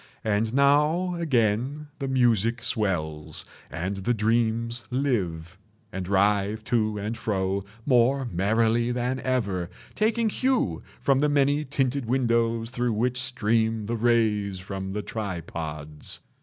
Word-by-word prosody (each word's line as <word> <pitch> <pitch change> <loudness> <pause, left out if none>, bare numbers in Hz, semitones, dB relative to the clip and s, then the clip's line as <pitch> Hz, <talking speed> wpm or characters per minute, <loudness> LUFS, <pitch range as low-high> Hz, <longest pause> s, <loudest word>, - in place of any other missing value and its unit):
And 110 +2 0
now 150 +6 +3
again 140 -2 0
the 135 - -2
music 120 -3 +2
swells, 80 -10 -1 0.2
and 90 +4 -3
the 120 +5 0
dreams 115 +2 0
live, 95 - -1 0.3
and 95 -3 -4
writhe 100 +2 +2
to 110 -2 0
and 105 +3 -3
fro 95 -3 -1 0.2
more 130 +1 +3
merrily 115 +4 +1
than 125 +1 -1
ever, 100 -10 -1 0.2
taking 225 +1 +1
hue 240 - 0 0.2
from 135 -1 +3
the 150 +1 +3
many 145 +1 +2
tinted 135 -2 -1
windows 115 -2 +1
through 120 -1 0
which 125 +4 0
stream 115 -3 0
the 115 +3 -2
rays 110 -4 +2
from 95 +1 -5
the 105 0 -3
tripods. 80 -8 -5
115 Hz, 125 wpm, -26 LUFS, 100-130 Hz, 0.3 s, now